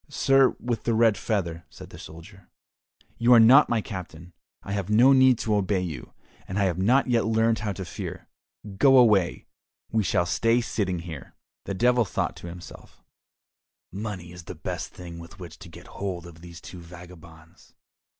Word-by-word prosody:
"Sir 135 -2 +3
with 120 -2 -4
the 115 - +1
red 115 -2 +4
feather," 90 -5 -3
said - - -13
the - - -12
soldier, 90 +4 -13 0.7
"you 120 +1 +5
are - - +7
not 125 +6 +7
my 115 -2 +1
captain, 90 -4 -9 0.3
I 100 - -7
have 100 -1 -3
no 120 +6 +5
need 130 -2 +5
to 110 - -2
obey 100 -2 0
you, 80 -8 -7 0.4
and 95 - -5
I 100 - +2
have 90 -2 -1
not 125 +8 +3
yet 120 -3 +1
learned 115 0 +1
how 105 -1 -3
to 95 0 -7
fear. - - -8 0.5
Go 135 +4 +5
away, 105 -8 +3 0.5
we 110 - +1
shall 85 -1 +1
stay 115 +6 +1
sitting 100 -6 -2
here." 80 -6 -10 0.3
The 100 - -4
Devil 120 +4 +3
thought - - -3
to - - -10
himself, 85 0 -12 0.9
"Money 95 -3 -6
is 90 -1 -12
the - - -8
best - - -5
thing 85 -2 -10
with 85 +2 -13
which 85 -5 -11
to - - -12
get - - -14
hold 90 -4 -6
of 85 -1 -14
these 85 -1 -12
two 90 - -11
vagabonds." 85 -1 -15
95 Hz, 180 wpm, -25 LUFS, 85-115 Hz, 0.9 s, are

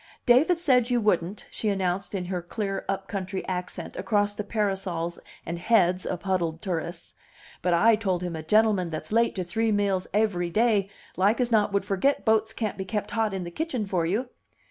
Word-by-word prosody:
"David 285 +8 +5
said 255 -7 +3
you 245 -1 +2
wouldn't," 200 -2 0
she 215 - -2
announced 195 0 -1
in 185 -2 -2
her 180 -1 -3
clear 195 +3 -3
up 195 0 -2
country 190 -1 -4
accent 180 -1 -4
across 205 -2 +1
the 210 - -4
parasols 190 -5 -2 0.3
and 170 +1 -4
heads 185 -3 +2
of 180 - -4
huddled 175 -4 -1
tourists, 170 -2 -4 0.5
"but 180 - +1
I 225 +6 +5
told 190 -5 -1
him 175 -2 -3
a 160 - -4
gentleman 205 +1 +3
that's 155 +4 -6
late 230 +2 +2
to 185 - -2
three 220 +6 0
meals 200 -3 +1
aivry 195 -4 +1
day 210 0 +2 0.3
like 200 +6 +3
as 245 -1 +1
not 210 -2 +3
would 200 -1 0
forget 205 +8 +1
boats 220 -1 +3
can't 215 -4 -3
be 190 - -3
kept 210 +2 -3
hot 225 -2 0
in 190 -1 -3
the 175 - -6
kitchen 260 - -2
for 180 -4 0
you." 230 +8 -1
195 Hz, 195 wpm, -26 LUFS, 180-220 Hz, 0.5 s, David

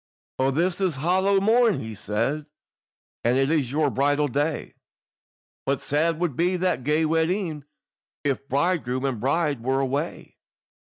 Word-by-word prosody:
"O 130 +1 +3
this 170 +7 0
is 185 -6 +1
hallow 190 +7 +2
morn," 225 +1 +3
he 110 -1 -6
said, 110 +9 -2 0.8
"And 120 +2 +3
it 135 +2 +2
is 145 -7 +1
your 150 -1 +1
bridal 145 +2 +2
day, 145 +4 -2 0.9
But 140 0 -1
sad 155 +3 +1
would 170 -7 -1
be 180 +4 +1
that 180 -8 0
gay 150 +4 +2
wedding, 160 -1 0 0.6
If 140 -1 -2
bridegroom 140 -3 0
and 130 -5 -1
bride 140 +1 0
were 130 +3 0
away. 140 +4 -3
150 Hz, 140 wpm, -25 LUFS, 135-170 Hz, 0.9 s, O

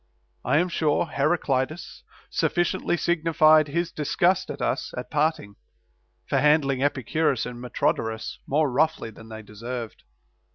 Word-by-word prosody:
I 130 +4 +2
am 175 +3 +2
sure, 160 -2 +1
Heraclides 150 0 -1 0.3
sufficiently 175 0 0
signified 155 -2 +4
his 170 +3 -2
disgust 175 +5 +1
at - - -6
us - - -2
at - - -6
parting, 150 -9 -1 0.7
for - - +1
handling 145 -3 +3
Epicurus 140 -1 0
and 120 -1 -7
Metrodorus 110 -2 -2
more 145 0 +1
roughly 155 -3 0
than 110 +1 -14
they 110 0 -8
deserved. 115 +2 -7
150 Hz, 125 wpm, -25 LUFS, 125-160 Hz, 0.7 s, signified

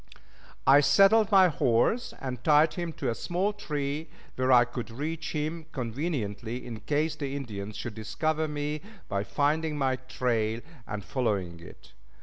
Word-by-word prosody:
] - - -25
I - - +8
saddled 205 +7 +5
my 190 -2 +7
horse 145 - +1
and 125 -3 -5
tied 155 +1 +5
him 175 -2 -3
to - - -2
a - - 0
small 185 - -1
tree 150 -4 -3 0.3
where 130 0 +1
I 120 -1 +7
could 120 -1 -6
reach 155 +6 -4
him 155 +1 -3
conveniently 120 -3 -3
in 115 -3 -6
case 150 +5 0
the 140 -2 -4
Indians 105 -6 -5
should 115 +1 -5
discover 155 +9 -1
me 150 0 -3 0.3
by 100 0 -1
finding 150 +7 0
my 130 -2 +1
trail 120 -3 -1 0.3
and 105 -1 -5
following 100 -9 -1
it. 85 - -14
140 Hz, 155 wpm, -28 LUFS, 115-155 Hz, 0.3 s, I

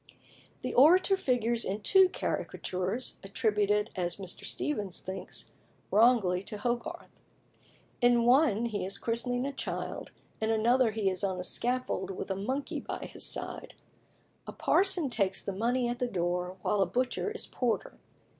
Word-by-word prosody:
The - - -3
Orator 360 +8 +6
figures 240 - +1
in 200 +3 -3
two 380 - +6
caricatures, 190 - -3
attributed, 210 +1 +1
as 175 -2 -1
Mr. 190 -3 -5
Steevens 205 - -2
thinks, 190 +1 -5 0.4
wrongly 210 -5 +4
to 210 +2 -6
Hogarth. 240 +2 -4 0.8
In 240 -1 +5
one 245 -3 +4
he 215 -3 -2
is 195 +2 -2
christening 245 +2 -1
a 280 - -3
child; - - -4 0.3
in 220 - 0
another 235 +3 +3
he 215 -2 -2
is 185 0 0
on 190 -2 -1
a - - -3
scaffold 250 +6 -1
with 195 0 -5
a - - 0
monkey 260 +9 -3
by - - -6
his - - -4
side. - - -3 0.7
A - - -4
parson 360 -7 +2
takes 195 -5 0
the 200 - -3
money 240 +5 0
at 240 0 -3
the 250 - 0
door, 180 -2 -2
while 205 - +1
a 190 - +3
butcher 250 - -1
is 450 - -4
porter. 245 -3 -2
225 Hz, 155 wpm, -30 LUFS, 195-250 Hz, 0.8 s, Orator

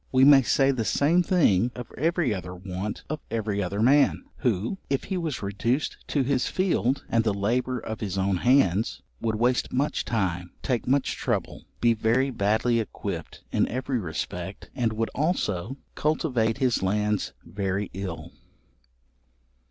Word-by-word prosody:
We 130 0 +5
may 140 0 +8
say 135 +2 +3
the 125 -4 -1
same 155 +10 +3
thing 130 - +3
of 125 -2 -8
every 160 -4 +1
other 90 -2 -6
want 95 +3 -5
of 155 0 -3
every 110 -2 -1
other 100 +3 -1
man, 140 +4 +4
who, 115 - -1
if 135 -1 0
he 190 - -3
was 160 - -3
reduced 115 +8 -1
to 140 - +1
his 130 -1 +1
field, 140 -8 0
and 115 -1 +2
the 105 -3 +1
labour 125 +5 0
of 110 -1 -5
his 100 -3 -3
own 95 0 +1
hands, 115 -3 +2 0.2
would 110 -1 0
waste 120 +3 +1
much 140 +4 0
time, 90 -5 -2
take 125 -3 -1
much 135 +1 +1
trouble, - - -2 0.2
be 120 -1 +5
very 115 +5 +1
badly 110 +2 +2
equipped 110 - -5
in - - +2
every 130 +1 -2
respect 85 -6 -5
and 115 -2 0
would 110 +1 -2
also 135 - -1 0.2
cultivate 130 -7 0
his 130 -4 +1
lands 105 +2 0
very 100 0 -2
ill. 95 -3 -5
115 Hz, 155 wpm, -26 LUFS, 100-135 Hz, 0.2 s, may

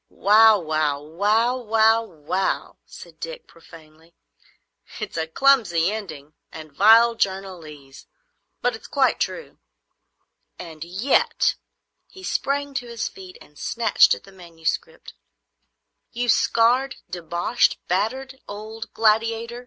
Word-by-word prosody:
"Wow—wow—wow—wow—wow!" 205 - +1
said - - -14
Dick, - - -7
profanely. 165 0 -18 0.8
"It's - - -6
a 160 0 -2
clumsy 195 -5 +2
ending 155 -9 -8 0.2
and 155 -2 -11
vile 225 +7 +6
journalese, 170 -9 -5 0.6
but 245 -2 +1
it's 220 - -12
quite 275 -2 +1
true. 485 - -4 1.0
And 160 -3 -9
yet,"—he 230 - -2
sprang 285 -4 -2
to 260 -3 -4
his 235 -2 -4
feet 185 -1 -13
and 150 - -18
snatched 230 -3 +3
at - - -14
the 195 - -16
manuscript,—"you 190 - -8
scarred, 245 +5 +2
deboshed, 175 +5 0
battered 260 +8 -2
old 215 +2 -8
gladiator! 225 +2 +1
210 Hz, 95 wpm, -23 LUFS, 165-235 Hz, 1.0 s, vile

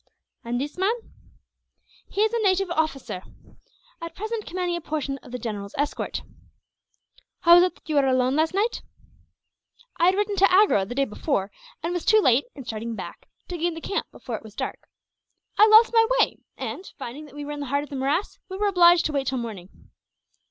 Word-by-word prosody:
"And 240 +1 -2
this 290 +6 -5
man?" 400 +5 +2 1.1
"He 405 - -1
is 440 +1 +2
a 470 - +1
native 385 -2 +2
officer, 310 - -2 0.8
at 335 -1 -7
present 435 +1 -4
commanding 360 -1 -2
a 345 - -4
portion 285 -3 -3
of 245 - -15
the 250 - -3
general's 210 -4 -6
escort." 290 +1 -2 1.2
"How 340 -1 +7
was 350 +1 +8
it 360 - -3
that - - -24
you 305 -2 0
were 275 -1 +4
alone, 255 0 +2
last 320 +3 +1
night?" 440 +4 0 1.2
"I 340 - +3
had 370 +1 +4
ridden 410 0 -1
to 390 0 +5
Agra, 370 - +4
the 245 - -6
day 275 0 +2
before; 210 -3 -2 0.3
and 335 +2 -1
was 355 - -2
too 435 - +5
late, 260 - +3
in 270 - -9
starting 230 0 -4
back, - - -9 0.2
to 350 -2 -5
gain 340 0 0
the - - -6
camp 395 - -3
before 240 - -6
it - - -8
was 220 -2 -13
dark. - - -5 0.7
I 425 - +8
lost 440 +2 +7
my 455 -1 +5
way - - +2 0.2
and, 370 - -5
finding 275 +6 -7
that 290 - -15
we 290 0 -6
were 295 - -6
in 295 - -5
the 285 - -4
heart 280 +3 0
of 295 - -12
the - - -5
morass, 280 +8 -1
we 380 - -5
were 415 - 0
obliged 350 -2 +6
to - - 0
wait 275 -2 -1
till 265 - 0
morning." 215 -7 -6
310 Hz, 210 wpm, -25 LUFS, 260-375 Hz, 1.2 s, was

